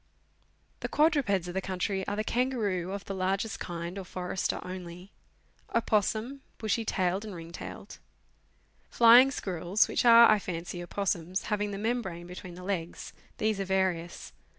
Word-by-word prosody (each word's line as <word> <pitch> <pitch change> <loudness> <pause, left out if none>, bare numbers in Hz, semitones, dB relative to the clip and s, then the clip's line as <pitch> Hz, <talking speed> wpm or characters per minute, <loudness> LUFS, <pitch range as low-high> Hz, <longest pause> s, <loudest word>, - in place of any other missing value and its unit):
The - - -4
quadrupeds 280 - +2
of 175 - -5
the 190 - -1
country 190 +1 -2
are 205 - -1
the 215 - -1
kangaroo 215 -7 -1
of 200 0 -5
the 195 - -4
largest 195 +3 -1
kind 175 +2 -5
or - - -5
forester 180 +1 -3
only; 180 +1 -8 0.6
opossum, 225 +4 0 0.2
bushy 220 +1 -1
tailed 190 -2 0
and 210 -3 -7
ring 165 0 -9
tailed; - - -9 0.9
flying 240 +3 +7
squirrels, 185 -4 0
which - - 0
are, 235 -1 +9
I 215 - +4
fancy, 175 -1 -5
opossums, 180 0 -2
having 210 0 -1
the 200 - -5
membrane 205 -6 -2
between 180 0 -9
the 180 - -10
legs 180 -3 -4 0.2
these 215 -1 0
are 195 - -1
various. 185 -3 -1
195 Hz, 150 wpm, -29 LUFS, 180-215 Hz, 0.9 s, are